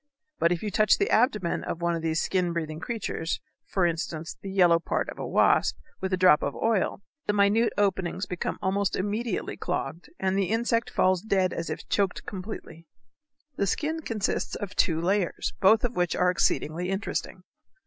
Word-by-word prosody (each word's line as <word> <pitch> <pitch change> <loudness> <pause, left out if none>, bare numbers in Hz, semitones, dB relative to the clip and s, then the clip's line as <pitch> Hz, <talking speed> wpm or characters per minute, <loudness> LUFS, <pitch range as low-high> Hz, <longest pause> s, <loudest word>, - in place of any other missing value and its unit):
But 170 - +3
if 175 +1 -1
you 210 - -2
touch 215 +3 +4
the 405 - 0
abdomen 215 -7 +2
of 170 - -4
one 170 0 +1
of 165 - -3
these 160 0 0
skin 180 -2 0
breathing 155 -2 -3
creatures, 200 -6 -3 0.3
for 190 -3 +1
instance 165 -1 -3
the 195 - -6
yellow 175 -3 +5
part 165 - -1
of - - -8
a - - -3
wasp, - - +3 0.2
with 190 0 -3
a 185 - +2
drop 180 -5 +6
of 140 - -2
oil, 215 -3 0 0.2
the 210 - +2
minute 205 +3 +3
openings 190 -2 0
become 180 -1 -3
almost 195 +1 +1
immediately 210 +2 -2
clogged 165 - -4
and 190 0 0
the 195 -2 +1
insect 230 +1 +1
falls 185 -1 +2
dead 190 -3 +1
as 165 -1 -4
if 155 - -5
choked 195 -3 0
completely. 185 -4 -7 0.7
The 200 - +1
skin 315 - -1
consists 220 -8 -2
of 205 -1 -6
two 165 -4 +2
layers, 185 +1 0
both 215 +3 +5
of 245 -1 -1
which 175 -1 +1
are 180 0 +3
exceedingly 175 0 0
interesting. 195 +2 -3
190 Hz, 180 wpm, -27 LUFS, 170-210 Hz, 0.7 s, drop